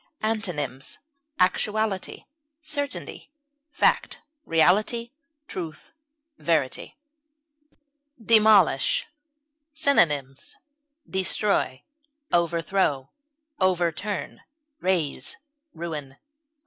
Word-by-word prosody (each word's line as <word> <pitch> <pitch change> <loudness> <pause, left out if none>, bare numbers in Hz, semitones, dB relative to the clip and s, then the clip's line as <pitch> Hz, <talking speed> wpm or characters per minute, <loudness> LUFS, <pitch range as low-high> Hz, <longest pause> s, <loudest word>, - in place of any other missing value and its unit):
Antonyms: 170 - -2 0.4
actuality, 210 +1 0 0.4
certainty, 285 -2 -4 0.4
fact, - - +1 0.3
reality, 210 +8 +2 0.4
truth, 165 -4 -7 0.5
verity. 155 -6 -1 1.2
DEMOLISH. 215 -10 +4 0.7
Synonyms: 160 - +2 0.5
destroy, 190 -7 0 0.5
overthrow, 170 -4 +1 0.5
overturn, 185 +1 -1 0.4
raze, 175 - -1 0.4
ruin. 150 -5 -6
180 Hz, 50 wpm, -25 LUFS, 155-215 Hz, 1.2 s, DEMOLISH